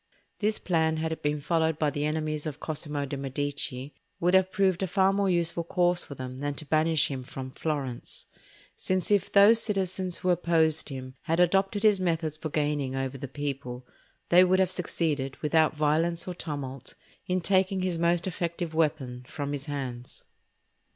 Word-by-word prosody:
This 215 Hz, 0 st, +1 dB
plan, 160 Hz, -3 st, +1 dB
had 160 Hz, 0 st, -2 dB
it 160 Hz, -, -4 dB
been 150 Hz, 0 st, 0 dB
followed 160 Hz, +1 st, +1 dB
by 150 Hz, -2 st, +1 dB
the 145 Hz, +1 st, -2 dB
enemies 155 Hz, 0 st, -2 dB
of 150 Hz, -1 st, -6 dB
Cosimo 150 Hz, -2 st, -3 dB
de' 140 Hz, -, -4 dB
Medici, 140 Hz, 0 st, -3 dB, 0.3 s
would 175 Hz, +2 st, +2 dB
have 190 Hz, 0 st, +4 dB
proved 190 Hz, -3 st, +2 dB
a 190 Hz, -, 0 dB
far 190 Hz, +2 st, +3 dB
more 200 Hz, -1 st, +1 dB
useful 170 Hz, -1 st, +1 dB
course 175 Hz, +1 st, +2 dB
for 140 Hz, -, -8 dB
them 130 Hz, 0 st, -7 dB
than 145 Hz, 0 st, -2 dB
to 155 Hz, -, -7 dB
banish 155 Hz, 0 st, +2 dB
him 135 Hz, -2 st, -4 dB
from 130 Hz, 0 st, -7 dB
Florence; 135 Hz, -5 st, -3 dB, 0.5 s
since 185 Hz, +1 st, -1 dB
if 200 Hz, -2 st, +2 dB
those 210 Hz, +3 st, +7 dB
citizens 190 Hz, -3 st, -1 dB
who 180 Hz, -, +1 dB
opposed 160 Hz, -3 st, +2 dB
him 130 Hz, -1 st, -7 dB
had 165 Hz, +1 st, 0 dB
adopted 195 Hz, +3 st, +2 dB
his 210 Hz, -3 st, +5 dB
methods 165 Hz, -4 st, -1 dB
for 155 Hz, 0 st, -5 dB
gaining 145 Hz, -3 st, -1 dB
over 135 Hz, 0 st, -2 dB
the 140 Hz, -, -5 dB
people, 135 Hz, -2 st, -5 dB, 0.4 s
they 180 Hz, +1 st, +7 dB
would 185 Hz, +1 st, +3 dB
have 185 Hz, -1 st, +2 dB
succeeded, 150 Hz, -7 st, -2 dB
without 155 Hz, 0 st, +3 dB
violence 165 Hz, +3 st, +1 dB
or 180 Hz, -, -3 dB
tumult, 140 Hz, -6 st, -6 dB, 0.3 s
in 185 Hz, 0 st, +1 dB
taking 190 Hz, +1 st, +1 dB
his 180 Hz, -3 st, -1 dB
most 170 Hz, 0 st, +2 dB
effective 170 Hz, -2 st, -3 dB
weapon 145 Hz, -6 st, -1 dB
from 145 Hz, +1 st, -4 dB
his 140 Hz, -1 st, -5 dB
hands. 130 Hz, -4 st, -6 dB
160 Hz, 175 wpm, -28 LUFS, 145-180 Hz, 0.5 s, those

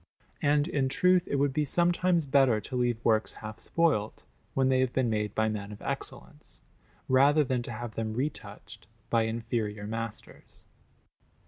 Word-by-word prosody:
And, 145 Hz, +1 st, +2 dB
in 140 Hz, -6 st, 0 dB
truth, 180 Hz, +5 st, +3 dB
it -, -, -1 dB
would 140 Hz, 0 st, +1 dB
be 150 Hz, -, +1 dB
sometimes 175 Hz, +2 st, +2 dB
better 135 Hz, -5 st, +3 dB
to 130 Hz, -, -7 dB
leave 120 Hz, -2 st, +1 dB
works 110 Hz, -1 st, +2 dB
half 110 Hz, 0 st, -9 dB
spoilt, 150 Hz, -11 st, 0 dB, 0.3 s
when 135 Hz, -1 st, +3 dB
they 130 Hz, -1 st, +3 dB
have 130 Hz, -1 st, +1 dB
been 125 Hz, -3 st, +1 dB
made 105 Hz, -1 st, -2 dB
by 110 Hz, 0 st, +2 dB
men 105 Hz, -1 st, -4 dB
of 105 Hz, -, -9 dB
excellence, -, -, -7 dB, 0.4 s
rather 140 Hz, +4 st, +5 dB
than 130 Hz, -2 st, -1 dB
to 120 Hz, -, -6 dB
have 120 Hz, 0 st, -6 dB
them 110 Hz, -1 st, -3 dB
retouched 140 Hz, +5 st, -6 dB, 0.2 s
by 115 Hz, -1 st, +3 dB
inferior 110 Hz, -2 st, -3 dB
masters. 115 Hz, 0 st, -7 dB
125 Hz, 160 wpm, -29 LUFS, 110-145 Hz, 0.4 s, rather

